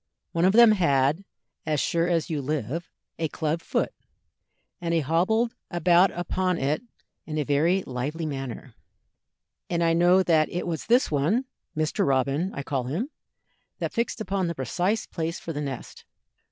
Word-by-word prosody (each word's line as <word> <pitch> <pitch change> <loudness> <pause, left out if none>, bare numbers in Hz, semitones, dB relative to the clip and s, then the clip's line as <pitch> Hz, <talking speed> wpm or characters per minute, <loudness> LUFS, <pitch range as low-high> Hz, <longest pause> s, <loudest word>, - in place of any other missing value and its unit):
One 170 0 +2
of 190 - +4
them 235 0 +8
had, 150 -3 +2 0.4
as 155 -2 0
sure 170 +4 +1
as 170 -3 +1
you 155 -3 -2
live, 150 +3 -3 0.3
a 160 - +1
club 160 +2 -2
foot, - - -1 0.9
and 170 -1 0
he 165 - +3
hobbled 190 - +1 0.2
about 175 +2 +4
upon 180 0 0
it 145 +5 0 0.5
in 155 -1 -3
a 150 - +1
very 160 +7 +2
lively 140 +6 -3
manner, 135 -5 -5 1.0
and 170 -1 +1
I 165 0 +3
know 175 +3 +5
that 160 -4 +3
it 175 - -3
was 165 -4 -4
this 240 -2 +3
one 165 - +1 0.3
Mr. 155 -1 +1
Robin, 140 +6 +1
I 140 - -4
call 135 -3 -2
him 185 - -3 0.7
that - - -3
fixed 235 0 -1
upon 195 -3 -1
the 170 - -3
precise 180 - -1
place 165 0 -4
for 165 - -6
the 145 - -3
nest. 135 -4 -6
165 Hz, 165 wpm, -26 LUFS, 145-180 Hz, 1.0 s, them